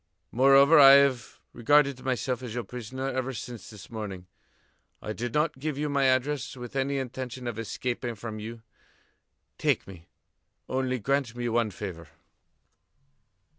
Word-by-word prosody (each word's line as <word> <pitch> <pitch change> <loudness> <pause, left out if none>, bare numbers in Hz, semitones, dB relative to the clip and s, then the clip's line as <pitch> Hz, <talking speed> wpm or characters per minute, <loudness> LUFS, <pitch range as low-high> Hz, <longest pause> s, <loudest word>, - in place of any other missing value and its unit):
Moreover, 135 +5 +6
I 135 -1 +10
have 140 -3 +3
regarded 140 +1 +3
myself 130 -1 -1
as 120 -3 -6
your 120 - -2
prisoner 125 +4 -6
ever 130 0 -3
since 115 0 -8
this 105 -1 -12
morning. 100 -5 -6 0.7
I 105 - -5
did 120 +2 -4
not 150 0 0
give 150 0 -3
you 150 +1 -1
my 140 -1 +2
address 130 +1 0
with 125 +1 -9
any 140 +1 0
intention 130 -1 -5
of 120 -2 -4
escaping 120 +1 -3
from 110 0 -7
you. 115 +1 -8 1.0
Take - - +1
me. 90 -3 -13 0.6
Only 130 -1 -1
grant 135 0 -1
me 120 0 -3
one 115 -1 +1
favor." 90 -4 -7
125 Hz, 145 wpm, -27 LUFS, 115-135 Hz, 1.0 s, I